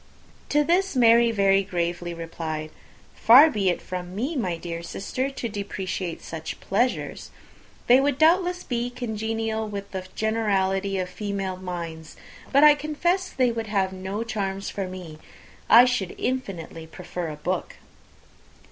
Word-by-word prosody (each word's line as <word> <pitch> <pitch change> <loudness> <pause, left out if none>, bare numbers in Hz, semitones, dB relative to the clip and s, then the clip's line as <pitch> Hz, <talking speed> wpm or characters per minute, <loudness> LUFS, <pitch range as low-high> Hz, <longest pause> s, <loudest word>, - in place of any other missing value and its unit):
To 295 0 +3
this, 365 +3 +1
Mary 235 -1 +6
very 195 -3 +3
gravely 175 -1 -2
replied, 160 -2 -5 0.4
"Far 275 +8 +7
be 200 -4 +1
it 175 - -2
from 180 0 -6
me, 265 +10 -2
my 185 - -1
dear 170 0 -6
sister, 225 +10 -3
to 270 -3 -4
depreciate 195 -4 -4
such 160 -1 -6
pleasures. 240 +6 -1 0.6
They 250 +2 +6
would 280 -1 +1
doubtless 355 +3 +3
be 240 -1 -2
congenial 225 -2 -3
with 200 -1 -6
the 185 -1 -5
generality 200 -3 0
of 185 -1 -1
female 195 0 -4
minds. 170 -3 -6 0.4
But 280 +2 +5
I 300 0 +9
confess 345 +6 -1
they 255 -2 +1
would 225 -1 -4
have 195 -3 0
no 190 +4 -4
charms 195 -4 -3
for 195 -2 -3
me. 180 -4 -9 0.5
I 240 +2 +9
should 210 -8 -1
infinitely 175 -10 -4
prefer 180 +1 -6
a 155 - -5
book." 150 - -3
200 Hz, 145 wpm, -25 LUFS, 180-245 Hz, 0.6 s, I